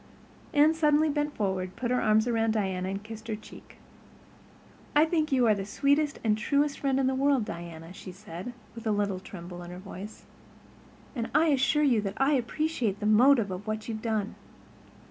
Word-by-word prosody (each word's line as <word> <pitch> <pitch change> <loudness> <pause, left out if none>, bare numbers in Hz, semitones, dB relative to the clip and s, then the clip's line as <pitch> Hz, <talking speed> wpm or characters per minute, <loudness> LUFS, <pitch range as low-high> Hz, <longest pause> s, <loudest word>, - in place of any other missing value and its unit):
Anne 300 +2 +5
suddenly 310 -1 +3
bent 295 0 -1
forward, 190 -3 -2
put 240 0 -2
her 250 - +2
arms 215 0 +3
about 225 -2 +1
Diana, 190 -3 -1
and 195 +1 -4
kissed 220 +1 -9
her 220 - -2
cheek. 215 - -14 1.2
"I 300 +2 +6
think 315 -2 0
you 255 -2 +3
are 220 - +5
the 200 -1 -3
sweetest 280 +7 +1
and 215 -2 +3
truest 280 +6 0
friend 270 -1 +1
in 270 - +2
the 260 - +2
world, 270 -3 +2
Diana," 170 -1 -8
she 190 -1 -9
said, 185 +3 -8 0.2
with 230 0 -7
a - - +2
little 205 -2 0
tremble 175 -2 -9
in 175 - -9
her 180 - -8
voice, 200 +2 -9 0.9
"and 235 -2 -3
I 325 0 +5
assure 285 +2 +3
you 240 -7 +3
I 270 +2 +3
appreciate 250 -5 -1
the 210 - -4
motive 225 0 +5
of 185 +3 -6
what 215 0 -3
you've 220 -2 -4
done." 220 -3 -1
225 Hz, 185 wpm, -28 LUFS, 200-280 Hz, 1.2 s, I